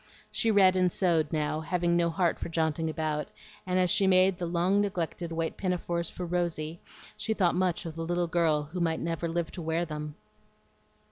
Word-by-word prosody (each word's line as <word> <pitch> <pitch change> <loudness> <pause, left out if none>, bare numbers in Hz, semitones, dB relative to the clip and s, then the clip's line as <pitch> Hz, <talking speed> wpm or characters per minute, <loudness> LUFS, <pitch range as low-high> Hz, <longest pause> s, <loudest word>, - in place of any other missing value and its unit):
She 225 - 0
read 195 -3 +5
and 180 -1 +3
sewed 165 -5 +1
now, 155 -1 0
having 170 +1 0
no 170 0 +2
heart 175 0 0
for - - -4
jaunting 160 -1 0
about; 155 -2 -2 0.4
and 180 0 +1
as 180 -1 +3
she 195 - +3
made 185 0 +4
the 175 - -2
long 180 +4 +2
neglected 175 -3 -3
white 165 0 -2
pinafores, 175 -2 -2
for 180 - -6
Rosy, 170 -2 -2 0.4
she 220 - -2
thought 180 -5 +2
much 185 -1 0
of 160 -2 -6
the 165 - -5
little 175 +1 0
girl 165 -3 +2
who 160 +5 -6
might 165 -2 0
never 170 0 -2
live 170 0 -2
to 180 - -6
wear 165 +1 0
them. 150 -2 -6
170 Hz, 195 wpm, -29 LUFS, 160-180 Hz, 0.4 s, read